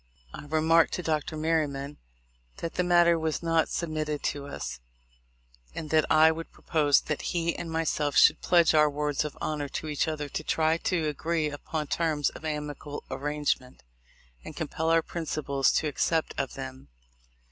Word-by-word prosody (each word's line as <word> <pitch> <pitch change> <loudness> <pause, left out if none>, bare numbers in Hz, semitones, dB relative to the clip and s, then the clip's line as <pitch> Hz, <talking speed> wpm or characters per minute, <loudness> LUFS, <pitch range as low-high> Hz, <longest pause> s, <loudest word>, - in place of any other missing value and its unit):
I - - -8
remarked 160 +2 +3
to 180 - -3
Dr. 155 -1 -1
Merryman 150 -3 -1 0.6
that 165 - -5
the 180 - 0
matter 175 -1 +4
was 160 0 -2
not 165 -1 +2
submitted 155 -3 -3
to 140 -1 -2
us, 70 - -6 1.0
and 155 - -6
that 155 -1 +3
I 155 +1 +7
would 165 +1 -6
propose 145 -3 +2
that 150 - -3
he 170 -1 -1
and 170 - -5
myself 155 -3 0
should - - +6
pledge 170 -2 +4
our 150 -1 +5
words 145 0 -1
of 150 - -6
honor 150 -2 -3
to 155 - -5
each 150 0 0
other 150 -2 -3
to 150 - -4
try 160 +1 +2
to 170 -2 -1
agree 155 +1 -1
upon 150 +1 -4
terms 155 -2 0
of - - -12
amicable 150 -1 -5
arrangement, 145 -3 -2 0.6
and - - -9
compel 160 +1 -2
our 165 0 +4
principals 145 -5 0
to 155 - +1
accept 160 +2 0
of 135 -2 -3
them. 130 0 -8
155 Hz, 165 wpm, -28 LUFS, 145-165 Hz, 1.0 s, I